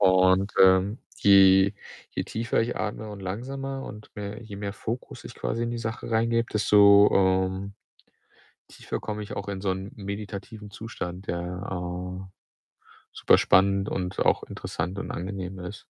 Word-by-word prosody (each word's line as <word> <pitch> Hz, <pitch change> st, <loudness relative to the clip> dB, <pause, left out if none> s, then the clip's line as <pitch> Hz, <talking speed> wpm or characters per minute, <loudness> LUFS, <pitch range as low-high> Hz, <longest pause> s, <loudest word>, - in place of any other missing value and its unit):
Und, 95 Hz, +1 st, +4 dB
ähm, 95 Hz, +4 st, +4 dB, 0.2 s
je 95 Hz, -1 st, +6 dB, 0.4 s
je -, -, -2 dB
tiefer 115 Hz, 0 st, -1 dB
ich 120 Hz, -, -3 dB
atme 105 Hz, +1 st, -4 dB
und 105 Hz, -, -8 dB
langsamer 135 Hz, +8 st, -5 dB
und 105 Hz, -3 st, -10 dB
mehr 105 Hz, +2 st, -6 dB
je 110 Hz, -3 st, -9 dB
mehr 100 Hz, 0 st, -4 dB
Fokus 115 Hz, +3 st, -6 dB
ich -, -, -9 dB
quasi 115 Hz, +1 st, -2 dB
in 120 Hz, -, -2 dB
die 120 Hz, -, -3 dB
Sache 110 Hz, 0 st, -5 dB
reingebe, 115 Hz, +1 st, +2 dB
desto, 100 Hz, -1 st, +6 dB
ähm, 95 Hz, +1 st, +1 dB, 0.9 s
tiefer -, -, -6 dB
komme 105 Hz, 0 st, -4 dB
ich 105 Hz, -, -7 dB
auch 100 Hz, 0 st, -5 dB
in 95 Hz, -1 st, -4 dB
so 95 Hz, -, 0 dB
'n 95 Hz, +2 st, -4 dB
meditativen 100 Hz, +1 st, -7 dB
Zustand, 95 Hz, -4 st, -7 dB
der, 85 Hz, -, -1 dB, 0.3 s
äh, 90 Hz, +1 st, -5 dB, 0.9 s
super -, -, +4 dB
spannend 100 Hz, +1 st, +3 dB
und 90 Hz, 0 st, -3 dB
auch -, -, +2 dB
interessant 95 Hz, +3 st, -5 dB
und -, -, -4 dB
angenehm 95 Hz, +1 st, -5 dB
ist. 90 Hz, +3 st, -8 dB
100 Hz, 155 wpm, -26 LUFS, 95-110 Hz, 0.9 s, je